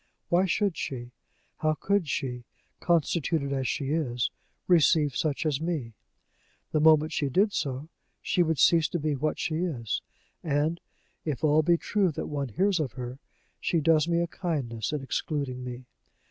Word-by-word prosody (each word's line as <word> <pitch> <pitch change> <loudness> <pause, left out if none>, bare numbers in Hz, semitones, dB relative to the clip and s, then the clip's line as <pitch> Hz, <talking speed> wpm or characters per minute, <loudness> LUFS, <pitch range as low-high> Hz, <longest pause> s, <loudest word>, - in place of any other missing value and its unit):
Why 180 +2 +3
should 200 -1 +1
she, 125 -4 -5 0.5
how 155 0 +1
could 200 0 0
she, 130 -3 -2 0.4
constituted 160 -3 +1
as 135 -2 -1
she 140 -3 -2
is, 125 -7 0 0.4
receive 155 -5 +4
such 155 +2 -1
as 150 -2 0
me? 155 -9 -2 0.8
The 155 - +2
moment 155 0 +5
she 145 -3 0
did 200 +9 +2
so, 135 +2 -2 0.3
she 180 - +1
would 160 -2 +2
cease 165 +4 +5
to 175 - -2
be 155 0 0
what 150 +3 -1
she 155 - -1
is; 150 -11 -2 0.4
and, 155 +2 0 0.4
if 150 -1 -3
all 155 0 +5
be 170 +2 +3
true 195 0 +1
that - - -4
one 140 -3 -3
hears 190 - +1
of 140 -7 -2
her, 125 +1 -6 0.4
she 170 - +1
does 155 0 +3
me 170 0 +2
a - - +2
kindness 140 - -3
in 150 -3 -3
excluding 135 -2 -2
me. 125 0 -7
155 Hz, 165 wpm, -28 LUFS, 135-170 Hz, 0.8 s, moment